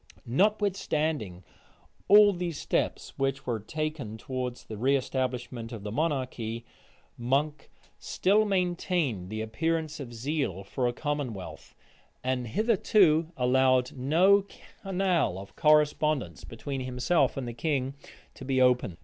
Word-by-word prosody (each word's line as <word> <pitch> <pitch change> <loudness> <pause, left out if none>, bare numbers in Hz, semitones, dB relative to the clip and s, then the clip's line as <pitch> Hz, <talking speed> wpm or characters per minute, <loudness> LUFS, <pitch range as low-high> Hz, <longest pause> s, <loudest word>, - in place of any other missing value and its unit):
Notwithstanding 155 - 0 0.6
all 205 0 +8
these 175 -4 -4
steps - - -2
which 135 0 -1
were 120 -3 -1
taking 145 -1 -4
towards 125 +1 -5
the - - -9
reëstablishment 125 -1 -1
of 110 -4 -7
monarchy, 120 -2 -2 0.5
Monk 140 +5 -1 0.3
still 205 +3 +2
maintained 175 - -1
the 110 +1 -4
appearance 155 +8 -2
of 130 -4 -7
zeal 120 - -2
for 125 +6 -1
a - - +1
commonwealth, 130 - -5 0.5
and 125 -1 -1
hitherto 185 - +3
allowed 130 0 +3
no 175 +10 +4 0.4
canal 185 - 0
of 95 +1 -10
correspondence 150 - +2
between 135 -2 -5
himself 130 +3 +1
and 130 -3 -3
the 120 - -5
king 135 +1 -1 0.4
to - - -11
be 130 0 0
opened. 125 -9 +3
135 Hz, 115 wpm, -28 LUFS, 120-160 Hz, 0.6 s, all